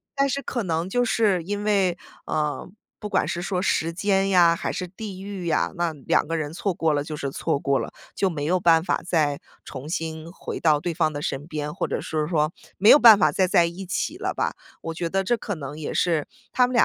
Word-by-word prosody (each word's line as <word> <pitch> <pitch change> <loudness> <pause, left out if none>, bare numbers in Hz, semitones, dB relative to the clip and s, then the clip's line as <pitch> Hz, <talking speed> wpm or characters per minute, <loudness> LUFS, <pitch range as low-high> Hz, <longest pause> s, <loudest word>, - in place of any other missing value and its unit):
但 275 0 +2
是 280 +2 -2
可 245 - -2
能 165 0 -1
就 245 +5 +1
是 210 -6 +2
因 205 +3 -3
为， 195 -4 +2 0.3
呃， 150 +2 -2 0.3
不 210 - -5
管 - - +1
是 175 - -3
说 180 0 -2
时 165 -3 0
间 195 +1 +1
呀， 175 -3 +5
还 - - -3
是 180 - -3
地 190 0 -8
域 195 -3 -6
呀， 160 - +1
那 170 -2 0
两 145 +1 0
个 165 - -2
人 155 -2 -3
错 190 +1 -1
过 160 -2 +1
了 145 0 0
就 155 -2 -5
是 140 -2 -4
错 140 - -1
过 140 -1 +1
了， - - -5 0.2
就 195 - +1
没 150 -4 -4
有 180 +4 +1
办 165 -1 +4
法 - - 0
再 150 -5 +1 0.2
重 135 +2 -8
新 160 -1 -4
回 - - -6
到 155 -3 +3
对 175 - -2
方 160 -1 +1
的 145 - -4
身 145 +1 -3
边， 150 -2 -4
或 - - -2
者 - - -2
是 155 -1 -2
说 155 -2 +1 0.3
没 205 +4 +5
有 295 - +9
办 225 -4 +9
法 - - +3
再 185 -2 +2
在 175 -1 +4
一 180 +3 -5
起 295 - -2
了 - - -2
吧。 - - -1 0.3
我 165 - -4
觉 170 0 -3
得 195 +1 0
这 240 +4 +1
可 205 -3 -4
能 145 0 -7
也 150 - -4
是 165 -4 +1 0.2
他 250 -1 +3
们 250 - -5
170 Hz, 255 characters per minute, -24 LUFS, 155-195 Hz, 0.3 s, 有